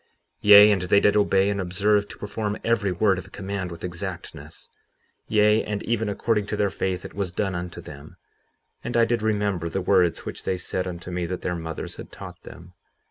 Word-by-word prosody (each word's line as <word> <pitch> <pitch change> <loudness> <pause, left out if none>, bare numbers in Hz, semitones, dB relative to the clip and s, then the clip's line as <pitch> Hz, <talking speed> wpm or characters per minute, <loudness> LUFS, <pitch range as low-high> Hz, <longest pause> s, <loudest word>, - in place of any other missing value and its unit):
57:21 - - -42 0.3
Yea, 105 0 +9
and 100 -3 +1
they 90 +2 +4
did 105 0 +3
obey 100 -2 +3
and 100 -1 -2
observe 100 +3 +1
to - - -11
perform 105 0 -3
every 115 -4 +1
word 95 +1 +2
of - - -11
command 95 -1 -4
with 85 0 -10
exactness; 85 -1 -7 0.6
yea, 105 0 +4
and 105 -1 -4
even 115 -2 -1
according 105 0 0
to 105 - -3
their 100 -2 +1
faith 95 -2 -3
it - - -8
was 100 -2 -3
done 95 +1 -2
unto 90 -1 -5
them; 70 +1 -11 0.7
and 120 - -2
I 115 - +5
did 115 -1 0
remember 100 -6 0
the 95 - -2
words 90 -2 +2
which - - -6
they 95 - -1
said 90 +1 -3
unto 90 0 -7
me 90 -1 -2
that 90 +1 -5
their 90 - -1
mothers 80 -1 -6
had - - -10
taught - - -10
them. 85 +2 -13
100 Hz, 205 wpm, -24 LUFS, 90-105 Hz, 0.7 s, Yea